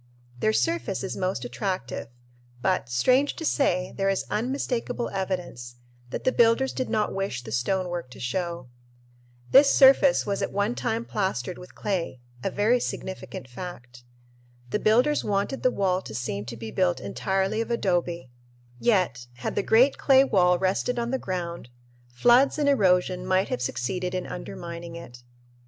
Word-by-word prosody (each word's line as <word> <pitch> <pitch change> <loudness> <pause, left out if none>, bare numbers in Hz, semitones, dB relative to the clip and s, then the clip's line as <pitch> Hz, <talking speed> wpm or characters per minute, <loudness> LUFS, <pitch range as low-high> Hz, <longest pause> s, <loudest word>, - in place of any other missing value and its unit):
Their 215 - +2
surface 330 - -1
is 190 - -4
most 185 -10 -2
attractive, 125 +2 -3 0.5
but, 185 -2 0
strange 255 - +2
to 325 - -5
say, 180 - +1
there 195 0 +1
is 195 - 0
unmistakable 245 0 -2
evidence 180 -11 -4 0.3
that - - -5
the 255 - +3
builders 240 +2 +3
did 255 - -3
not 215 -2 0
wish 195 -10 -3
the 110 - -8
stonework 175 - -1
to 125 - -13
show. 170 +2 -3 0.8
This 275 +1 +7
surface 270 0 +6
was 200 -1 -2
at - - -2
one 205 +3 0
time 230 -1 -2
plastered 190 - -2
with 180 - -13
clay, 180 -10 -2 0.2
a - - 0
very 225 +4 +2
significant 190 - -6
fact. 120 -4 -9 0.7
The - - 0
builders 250 +9 +3
wanted 205 +6 -1
the 255 - +4
wall 190 -5 0
to 110 - -9
seem 110 -4 -3
to 115 0 -7
be 110 -1 -7
built 180 +3 +1
entirely 195 +3 -1
of 230 - -4
adobe, 175 - -1 0.5
yet, 180 - +1
had 125 - -4
the - - 0
great 240 +7 +4
clay 270 -1 +6
wall 180 -8 +3
rested 190 +7 0
on 235 0 -1
the 265 - 0
ground, 170 -7 -5 0.4
floods 240 - +4
and 295 -1 +1
erosion 185 -8 +3
might 185 +1 +1
have 125 - -2
succeeded 180 +10 -2
in 185 - -2
undermining 170 -1 -7
it. 120 -8 -10
190 Hz, 160 wpm, -26 LUFS, 170-230 Hz, 0.8 s, This